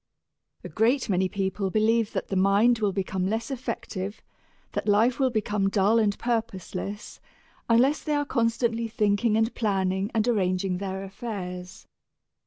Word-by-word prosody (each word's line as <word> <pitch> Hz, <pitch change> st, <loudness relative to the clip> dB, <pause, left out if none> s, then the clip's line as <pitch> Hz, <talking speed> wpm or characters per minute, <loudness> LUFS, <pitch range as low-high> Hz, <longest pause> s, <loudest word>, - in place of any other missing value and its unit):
A -, -, -7 dB
great 240 Hz, +4 st, +1 dB
many 185 Hz, -1 st, +1 dB
people 195 Hz, 0 st, -2 dB
believe 220 Hz, +2 st, +2 dB
that -, -, -3 dB
the 195 Hz, -, -2 dB
mind 200 Hz, +5 st, +4 dB
will 205 Hz, -2 st, +1 dB
become 190 Hz, -1 st, -2 dB
less 225 Hz, +5 st, -2 dB
effective, 220 Hz, -5 st, -4 dB, 0.5 s
that -, -, -3 dB
life 225 Hz, +5 st, +3 dB
will 265 Hz, -1 st, +3 dB
become 210 Hz, -3 st, 0 dB
dull 205 Hz, +3 st, +3 dB
and 205 Hz, -2 st, +1 dB
purposeless, 210 Hz, -3 st, -4 dB, 0.5 s
unless 255 Hz, +6 st, +4 dB
they 300 Hz, -, -1 dB
are 290 Hz, 0 st, 0 dB
constantly 230 Hz, -2 st, 0 dB
thinking 215 Hz, 0 st, +1 dB
and 225 Hz, +1 st, +1 dB
planning 195 Hz, -2 st, 0 dB
and 220 Hz, +1 st, +2 dB
arranging 185 Hz, -4 st, 0 dB
their 190 Hz, 0 st, -4 dB
affairs. 190 Hz, -3 st, -7 dB
210 Hz, 145 wpm, -26 LUFS, 195-230 Hz, 0.5 s, mind